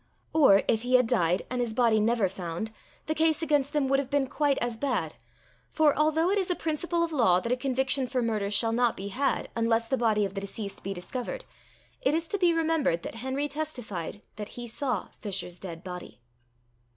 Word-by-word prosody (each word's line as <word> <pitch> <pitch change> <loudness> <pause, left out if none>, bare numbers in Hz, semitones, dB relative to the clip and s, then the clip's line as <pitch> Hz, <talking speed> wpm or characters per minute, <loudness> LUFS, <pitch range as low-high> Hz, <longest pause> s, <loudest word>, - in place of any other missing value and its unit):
Or, 275 -11 +6
if 220 - +2
he 250 +1 +2
had 250 -1 +6
died, 180 -4 +2
and 250 -1 0
his 230 -2 -2
body 230 -3 +4
never 220 -1 +2
found, 180 +3 -5 0.3
the 310 - 0
case 315 0 +2
against 290 -3 +2
them 295 -3 +1
would 275 +1 +3
have 275 -2 -3
been 285 -1 +2
quite 285 +1 +1
as 240 -1 -1
bad, 265 +2 -1 0.6
for, 310 -2 +3
although 315 +4 +2
it 405 - +2
is 375 - -1
a 360 - +1
principle 335 +2 -1
of 335 - -2
law 230 - +4
that 235 +5 -3
a - - +4
conviction 265 0 0
for 255 0 -1
murder 215 -3 0
shall 225 +3 +2
not 235 0 +2
be 195 +1 -5
had, 275 +7 -1
unless 230 0 +1
the 265 - 0
body 215 -3 +2
of 195 - -5
the 195 - -4
deceased 200 0 -6
be 195 - -3
discovered, 255 - -5 0.6
it 275 +4 +2
is 330 0 -1
to 405 - -1
be 355 -2 +5
remembered, 320 - +1
that - - -5
Henry 265 +5 -2
testified 245 - -5
that 210 -1 -5
he 240 - -5
saw 250 -1 -2
Fisher's 185 -3 -3
dead 170 -2 -8
body. 180 -6 -8
250 Hz, 210 wpm, -28 LUFS, 210-295 Hz, 0.6 s, Or